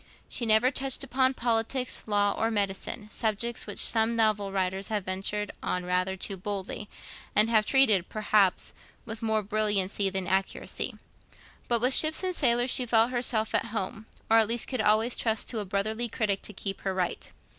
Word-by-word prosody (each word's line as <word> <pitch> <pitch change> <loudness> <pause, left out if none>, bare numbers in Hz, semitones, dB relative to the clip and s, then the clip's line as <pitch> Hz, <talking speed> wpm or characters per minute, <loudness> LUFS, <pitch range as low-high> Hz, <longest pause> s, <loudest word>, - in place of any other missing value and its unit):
She 235 - -4
never 220 +4 +4
touched 270 0 -1
upon 260 0 +1
politics, 240 +2 0
law, 205 -1 +2
or 225 - 0
medicine, 205 +1 -3
subjects 230 +1 -2
which - - -7
some 225 0 +4
novel 215 -3 +1
writers 190 0 -2
have 210 -3 -3
ventured 195 +2 -2
on 180 0 -2
rather 185 +1 -1
too 195 +1 -5
boldly, 200 +2 -5 0.5
and 215 +2 +4
have 215 -2 +3
treated, 220 -10 +4
perhaps, 210 -3 +1 0.3
with 225 -1 -7
more 220 -1 0
brilliancy 205 -1 +1
than 190 -1 -3
accuracy. 190 +2 -2 0.7
But 235 -2 +1
with 250 +2 +2
ships 310 +5 +4
and 370 0 -1
sailors 245 -3 +3
she 250 - +2
felt 225 +1 +3
herself 240 -3 -1
at - - +1
home, 220 0 -4 0.2
or 225 0 +5
at 220 - +3
least 230 +1 +1
could 255 -4 -1
always 215 +3 +2
trust 220 -2 -1
to 230 - -3
a 205 - -4
brotherly 215 +5 -2
critic 210 -3 -1
to - - -4
keep 195 0 -5
her 190 -1 -3
right. 180 -2 -3
215 Hz, 175 wpm, -27 LUFS, 200-235 Hz, 0.7 s, or